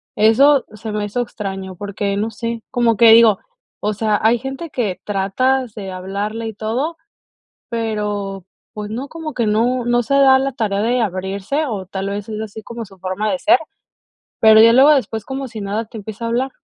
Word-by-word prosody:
Eso 265 Hz, +6 st, +5 dB
se 215 Hz, +1 st, -6 dB
me 210 Hz, 0 st, -2 dB
hizo 245 Hz, +4 st, -2 dB
extraño, 195 Hz, -5 st, -6 dB
porque, 200 Hz, +1 st, -3 dB
no 215 Hz, +2 st, -1 dB
sé, 230 Hz, +1 st, -4 dB
como 240 Hz, -3 st, +2 dB
que 230 Hz, -1 st, +7 dB
digo, 225 Hz, -4 st, +6 dB, 0.4 s
o 210 Hz, 0 st, 0 dB
sea, 215 Hz, -1 st, +1 dB
hay 230 Hz, +2 st, +4 dB
gente 270 Hz, +5 st, -6 dB
que 220 Hz, -8 st, -2 dB
tratas 220 Hz, +5 st, 0 dB
de 195 Hz, -3 st, -6 dB
hablarle 200 Hz, +5 st, -4 dB
y 220 Hz, -, -5 dB
todo, 245 Hz, +10 st, -2 dB, 0.8 s
pero, 210 Hz, -4 st, -3 dB, 0.3 s
pues, 210 Hz, -1 st, -5 dB
no, 255 Hz, +5 st, -5 dB
como 320 Hz, -2 st, -7 dB
que 235 Hz, -3 st, 0 dB
no 235 Hz, +4 st, +1 dB
no 240 Hz, 0 st, +2 dB
se 275 Hz, +5 st, -1 dB
da 270 Hz, -1 st, +6 dB
la 270 Hz, 0 st, -1 dB
tarea 210 Hz, -4 st, -1 dB
de 245 Hz, +2 st, +1 dB
abrirse, 195 Hz, -, -2 dB
o 205 Hz, -6 st, -4 dB
tal 195 Hz, +1 st, -4 dB
vez 205 Hz, +1 st, -5 dB
es 215 Hz, 0 st, -4 dB
así 220 Hz, 0 st, -7 dB
como 235 Hz, +1 st, -7 dB
su 195 Hz, -1 st, -17 dB
forma 190 Hz, +3 st, -2 dB
de 275 Hz, -, -1 dB
ser, 335 Hz, +6 st, +4 dB, 0.8 s
pero 220 Hz, -1 st, +7 dB
ya 230 Hz, +1 st, +7 dB
luego 270 Hz, +4 st, +7 dB
después 225 Hz, -6 st, -1 dB
como 265 Hz, 0 st, -4 dB
si 220 Hz, -3 st, -8 dB
nada 210 Hz, +3 st, -2 dB
te 225 Hz, +1 st, -11 dB
empieza 220 Hz, +2 st, -7 dB
a -, -, -1 dB
hablar. 255 Hz, +3 st, 0 dB
220 Hz, 200 wpm, -19 LUFS, 205-245 Hz, 0.8 s, que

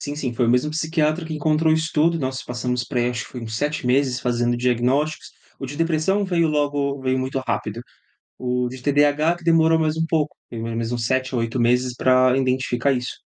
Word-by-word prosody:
Sim, 145 Hz, 0 st, -5 dB
sim. 135 Hz, -5 st, -3 dB
Foi 120 Hz, 0 st, +1 dB
o -, -, +3 dB
mesmo 125 Hz, +5 st, +2 dB
psiquiatra 160 Hz, +1 st, 0 dB
que 160 Hz, -, -6 dB
encontrou 155 Hz, +1 st, +2 dB
isso 160 Hz, 0 st, 0 dB
tudo, 165 Hz, +2 st, +3 dB
nós 130 Hz, -2 st, -3 dB
passamos 125 Hz, 0 st, -2 dB
por 125 Hz, -, -7 dB
aí, 120 Hz, 0 st, +2 dB
acho 120 Hz, -1 st, -4 dB
que -, -, -14 dB
foi 125 Hz, -, -6 dB
uns 110 Hz, -1 st, -5 dB
7 145 Hz, +1 st, -2 dB
meses 130 Hz, 0 st, +2 dB
fazendo 120 Hz, -1 st, 0 dB
diagnósticos, 125 Hz, +5 st, 0 dB, 0.3 s
o 135 Hz, -, -4 dB
de 140 Hz, +3 st, -7 dB
depressão 165 Hz, +5 st, +1 dB
veio 170 Hz, -3 st, +1 dB
logo 145 Hz, -2 st, 0 dB
veio 130 Hz, 0 st, 0 dB
muito 130 Hz, +1 st, -2 dB
rápido. 110 Hz, +2 st, -2 dB, 0.6 s
O 125 Hz, 0 st, -1 dB
de 130 Hz, 0 st, -9 dB
TDAH 145 Hz, +4 st, +2 dB
que 175 Hz, -, -17 dB
demorou 165 Hz, -1 st, +4 dB
mais 155 Hz, -1 st, +1 dB
um 165 Hz, -, +1 dB
pouco, 155 Hz, -2 st, 0 dB
demorou 115 Hz, 0 st, -5 dB
mais 115 Hz, 0 st, -2 dB
uns 120 Hz, -2 st, -2 dB
7 130 Hz, +1 st, 0 dB
ou 120 Hz, -, +1 dB
8 115 Hz, +2 st, -2 dB
meses 125 Hz, +1 st, +2 dB
pra 130 Hz, 0 st, +4 dB
identificar 130 Hz, 0 st, 0 dB
isso. 125 Hz, -2 st, -3 dB
130 Hz, 215 wpm, -22 LUFS, 125-155 Hz, 0.6 s, demorou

